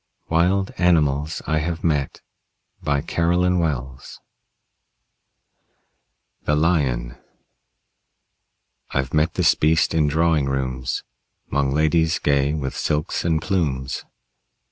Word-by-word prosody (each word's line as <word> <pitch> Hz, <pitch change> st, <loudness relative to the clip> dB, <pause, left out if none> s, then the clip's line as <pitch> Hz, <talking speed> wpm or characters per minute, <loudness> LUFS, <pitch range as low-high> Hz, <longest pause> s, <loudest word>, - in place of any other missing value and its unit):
WILD 90 Hz, +4 st, +1 dB
ANIMALS 75 Hz, -4 st, +2 dB
I 80 Hz, -, +1 dB
HAVE 80 Hz, +1 st, -3 dB
MET 75 Hz, -5 st, -1 dB, 0.6 s
BY 70 Hz, -1 st, 0 dB
CAROLYN 90 Hz, +3 st, +1 dB
WELLS 65 Hz, -5 st, -4 dB, 2.3 s
THE 75 Hz, -, +2 dB
LION 65 Hz, -7 st, 0 dB, 1.7 s
I've 65 Hz, -1 st, -2 dB
met 75 Hz, +2 st, +1 dB
this -, -, +4 dB
beast 80 Hz, +1 st, +2 dB
in 80 Hz, -2 st, +2 dB
drawing 80 Hz, 0 st, +2 dB
rooms, 65 Hz, -1 st, -2 dB, 0.5 s
'Mong 70 Hz, -1 st, +1 dB
ladies 80 Hz, +2 st, +2 dB
gay 70 Hz, +1 st, +1 dB
with 70 Hz, -3 st, -4 dB
silks 75 Hz, +3 st, -1 dB
and 80 Hz, -2 st, +1 dB
plumes. 70 Hz, -9 st, -1 dB
75 Hz, 100 wpm, -22 LUFS, 70-85 Hz, 2.3 s, this